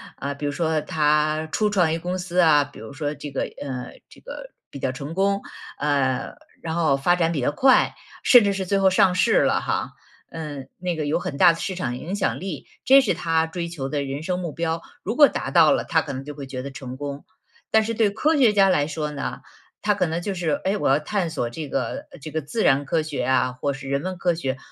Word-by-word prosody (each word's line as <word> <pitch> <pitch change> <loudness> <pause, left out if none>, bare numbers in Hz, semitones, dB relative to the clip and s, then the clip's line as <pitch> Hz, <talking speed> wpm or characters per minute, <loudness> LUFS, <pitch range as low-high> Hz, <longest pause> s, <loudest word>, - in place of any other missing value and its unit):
啊， 140 +1 -4
比 145 +1 -6
如 145 - 0
说 160 +1 0
他 155 +1 +1
初 210 -1 +1
创 180 -6 +2
一 165 - 0
个 - - -10
公 180 +2 -2
司 180 0 -2
啊， 155 -4 +6
比 145 0 -13
如 110 +5 -9
说 145 0 -3
这 145 0 -8
个 135 - -2
呃， 130 -3 -5 0.2
这 - - -18
个 - - -9 0.2
比 140 - -9
较 130 - -1
成 140 +4 -6
功。 200 +2 +1 0.4
呃， 140 -3 0 0.3
然 160 - -4
后 160 -5 +3
发 175 +6 +2
展 165 -1 +2
比 140 - -1
较 125 - +1
快， 260 - +4 0.3
甚 245 -4 +7
至 200 - +2
是 190 -1 -3
最 195 +2 +1
后 190 -1 +5
上 185 0 +4
市 225 +5 +4
了 - - +2
哈， - - -2 0.4
嗯， 150 -4 -7
那 180 -1 -2
个 155 -2 -3
有 150 - +1
很 140 -4 -5
大 175 -2 +7
的 165 - -8
市 190 - -3
场 125 -9 -3
影 180 +9 -5
响 195 - -1
力， 180 -7 -6 0.2
这 275 +1 +8
是 245 - +1
他 165 -1 +1
追 170 +1 -4
求 145 -6 -5
的 145 -1 -1
人 140 +2 -4
生 180 +1 -1
目 175 -3 -4
标。 165 0 -2 0.2
如 220 +5 -2
果 290 -1 +8
达 - - -4
到 - - +6
了， - - +2
他 - - +2
可 - - -6
能 130 +1 -5
就 145 +1 -8
会 140 -1 -7
觉 130 -1 -5
得 140 - -6
成 130 -1 -8
功。 140 +1 -6 0.5
但 220 0 +5
是 230 +1 -2
对 215 -2 +2
科 300 +9 +1
学 240 -6 +5
家 195 -2 +5
来 145 -6 +3
说 150 0 -3
呢， 140 - -5 0.4
他 210 0 +2
可 185 -3 +1
能 165 +1 -2
就 200 +2 -3
是： 175 -3 -1
“哎， 200 +2 +1
我 - - 0
要 140 +3 +4
探 180 +2 -2
索 120 -5 -2
这 150 +5 -6
个 125 -4 -3 0.2
这 155 - -7
个 160 +1 -2
自 215 +10 -2
然 140 +1 +3
科 160 +4 +1
学 155 -2 -3
啊， 130 -1 +2
或 140 +3 -2
是 135 0 -8
人 140 +1 -1
文 185 0 -4
科 175 -1 +1
学， 135 -5 -3
160 Hz, 270 characters per minute, -23 LUFS, 140-185 Hz, 0.5 s, 这